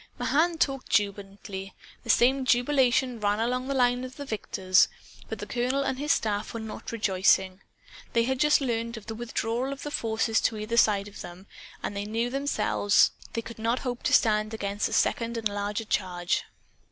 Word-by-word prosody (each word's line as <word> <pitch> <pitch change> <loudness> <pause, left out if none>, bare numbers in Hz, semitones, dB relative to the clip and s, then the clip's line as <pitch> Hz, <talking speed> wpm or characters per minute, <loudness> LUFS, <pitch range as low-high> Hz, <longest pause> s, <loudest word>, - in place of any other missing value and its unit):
Mahan 330 +3 +1
talked 270 -5 -1
jubilantly. 195 -1 -2 0.3
The 235 - -12
same 260 +4 +4
jubilation 255 -1 +2
ran 205 0 +1
all 230 +2 +1
along 250 +1 -2
the 275 - -1
line 245 -1 +2
of 255 0 -8
victors. 205 -8 +1 0.4
But - - -4
the - - -6
colonel 255 +3 0
and 265 -1 -2
his 295 +2 0
staff 215 -5 -1
were - - -3
not 220 +3 -7
rejoicing. 190 -3 +2 0.5
They 230 - +3
had 260 +2 -1
just 300 +1 +4
learned 230 -2 -2
of 215 - -10
the 225 - -5
withdrawal 235 +2 -2
of 275 - -7
the 295 - -5
forces 225 -2 0
to 225 - 0
either 215 +2 -3
side 205 -3 +3
of 205 - -10
them, 175 +2 -10 0.4
and - - -3
they 200 0 -3
knew 230 +3 -1
they 275 - -1
themselves 275 -7 +2 0.2
could 230 0 -6
not 230 +3 0
hope 245 -1 -3
to - - 0
stand 215 0 +3
against 200 -1 -2
a - - -6
second 235 0 +1
and 225 -1 0
larger 205 +2 -3
charge. 180 -4 -1
230 Hz, 190 wpm, -27 LUFS, 205-255 Hz, 0.5 s, same